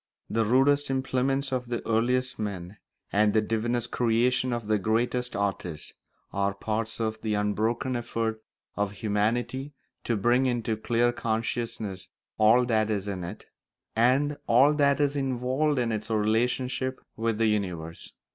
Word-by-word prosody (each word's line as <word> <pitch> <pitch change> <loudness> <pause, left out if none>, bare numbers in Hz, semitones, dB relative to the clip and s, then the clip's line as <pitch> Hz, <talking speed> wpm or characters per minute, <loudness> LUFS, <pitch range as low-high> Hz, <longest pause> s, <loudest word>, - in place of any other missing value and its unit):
The 115 0 +2
rudest 135 +5 +3
implements 135 +1 0
of 125 -1 -2
the 120 -1 -4
earliest 125 +3 +1
men 100 -2 -5 0.4
and 105 0 +3
the 110 - +4
divinest 120 +2 -1
creations 125 +2 +2
of 120 -2 -3
the 105 0 +1
greatest 120 +4 0
artists 95 -6 -3 0.4
are 100 0 0
parts 110 +2 -3
of 110 -1 -2
the 110 -2 -1
unbroken 110 +5 0
effort 115 -2 -2 0.3
of 105 0 -1
humanity 115 +7 -1 0.3
to 115 - +1
bring 120 +5 +3
into 120 -3 0
clear 120 +2 +1
consciousness 110 -5 -3 0.3
all 115 +4 +6
that 110 -3 +1
is 105 -2 -1
in 95 -3 -3
it, 85 +5 -7 0.5
and 135 +6 +3
all 135 +6 +6
that 140 -1 +3
is 145 -1 +1
involved 135 +2 0
in 120 -2 +1
its 110 0 -3
relationship 125 +4 0 0.2
with 115 -1 -1
the 115 - +2
universe. 90 -6 -2
115 Hz, 145 wpm, -27 LUFS, 105-125 Hz, 0.5 s, all